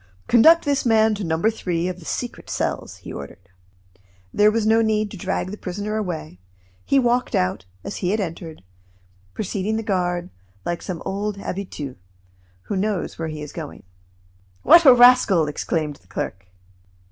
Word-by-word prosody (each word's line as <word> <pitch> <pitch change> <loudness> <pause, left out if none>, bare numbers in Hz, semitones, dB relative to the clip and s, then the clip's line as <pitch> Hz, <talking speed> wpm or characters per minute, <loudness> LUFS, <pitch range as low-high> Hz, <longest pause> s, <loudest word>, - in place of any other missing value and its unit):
"Conduct 320 +9 +6
this 285 -1 +1
man 220 -2 +4
to 205 -1 -4
No. 160 -2 -1
3 180 -4 0
of 185 -1 -5
the 165 - -14
secret 245 +7 -5
cells," - - -3
he - - -10
ordered. 90 +6 -10 0.8
There 210 0 +5
was 220 0 0
no 225 +1 +4
need 215 -2 0
to 200 - -8
drag 185 0 -2
the 210 - -8
prisoner 205 +3 -4
away. 160 - -4 0.4
He 275 - +2
walked 245 -1 +1
out, 90 0 0 0.2
as - - -5
he 180 - -1
had 215 +3 +1
entered, 165 - -6 0.7
preceding 210 +1 -2
the 225 - -3
guard, 180 -3 -1 0.3
like 175 0 -2
some 175 -3 -6
old 205 +1 -3
habitue, 180 -9 -6 0.7
who 205 - -4
knows 200 -3 -2
where 165 - -2
he 155 -1 -6
is 150 - -8
going. 155 -4 -8 0.8
"What 340 -1 +7
a 260 - +10
rascal!" 245 -9 +6
exclaimed 150 0 -2
the 90 - -29
clerk. 95 +1 -5
195 Hz, 165 wpm, -22 LUFS, 165-220 Hz, 0.8 s, a